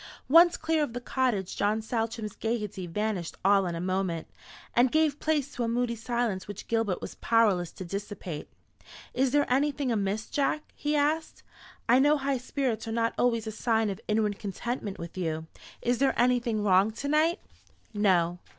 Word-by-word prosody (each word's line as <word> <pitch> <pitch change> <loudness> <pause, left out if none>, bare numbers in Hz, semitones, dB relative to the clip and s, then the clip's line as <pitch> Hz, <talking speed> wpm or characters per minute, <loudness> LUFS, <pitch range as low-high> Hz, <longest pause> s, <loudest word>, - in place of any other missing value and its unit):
Once 340 +4 +7
clear 320 0 0
of 290 -6 -1
the 245 - -3
cottage, 240 -6 -1
John 210 +2 +1
Saltram's 225 -1 -3
gaiety 210 -5 -3
vanished 195 -1 -2
all 195 -1 +4
in 170 - -3
a - - -4
moment, 185 -2 -1 0.5
and 245 +1 +4
gave 310 -2 +2
place 295 -3 0
to 240 - -2
a - - 0
moody 235 0 0
silence 230 -4 -2
which 205 -2 -8
Gilbert 225 -5 0
was - - -6
powerless 205 -7 +2
to 185 - -7
dissipate. 195 -4 -6 0.6
"Is 260 +1 +2
there 290 +2 +3
anything 280 0 +1
amiss, 210 0 -1
Jack?" 295 +2 0
he 295 +1 -1
asked. 305 +2 0 0.4
"I 245 +2 +6
know 295 +2 +4
high 275 -1 -1
spirits 250 -3 -2
are - - -3
not 230 0 0
always 230 -2 +1
a 220 - -3
sign 225 -1 +1
of 195 +3 -7
inward 210 -1 0
contentment 205 +1 -4
with 170 +2 -7
you. 160 -2 -2 0.4
Is 240 0 +1
there 275 0 +2
anything 240 -3 +2
wrong 195 +1 +4
to 280 +5 -5
night?" 315 +5 +2 0.5
"No." 180 -4 +2
230 Hz, 175 wpm, -28 LUFS, 200-260 Hz, 0.6 s, Once